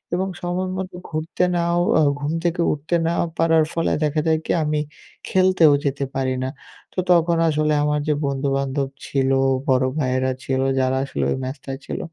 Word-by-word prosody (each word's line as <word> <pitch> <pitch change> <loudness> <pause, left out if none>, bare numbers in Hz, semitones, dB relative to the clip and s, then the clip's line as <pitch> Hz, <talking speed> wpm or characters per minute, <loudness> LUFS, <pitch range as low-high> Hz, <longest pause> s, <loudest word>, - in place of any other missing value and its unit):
এবং 190 +2 -1
সময়মতো 185 +1 -3
ঘুরতে 160 +3 -2
নাও 170 0 +1 0.2
আ - - +5 0.2
ঘুম 145 +2 -2
থেকে 175 0 0
উঠতে 155 +4 -2
না 170 - +1 0.2
পারার 165 -1 +4
ফলে 165 - 0
দেখা 155 +1 +1
যায় 160 -1 +3
কি? - - -1
আমি 150 0 0 0.5
খেলতেও 185 -5 +4
যেতে 140 0 -1
পারি 130 -1 0
না। 130 - -1 0.4
তো - - -3
তখন 170 -1 +4
আসলে 155 0 +1
আমার 150 0 +1
যে 150 - +3
বন্ধু-বান্ধব 135 0 -1 0.2
ছিল, 135 -1 0 0.4
বড় 130 0 +3
ভাইয়েরা 130 -1 +1
ছিল, 130 0 -1 0.2
যারা 130 0 +1
আসলে 140 - -3
ওই - - -1
ম্যাচটায় 135 0 -6
ছিল - - -4
150 Hz, 170 wpm, -22 LUFS, 135-170 Hz, 0.5 s, আ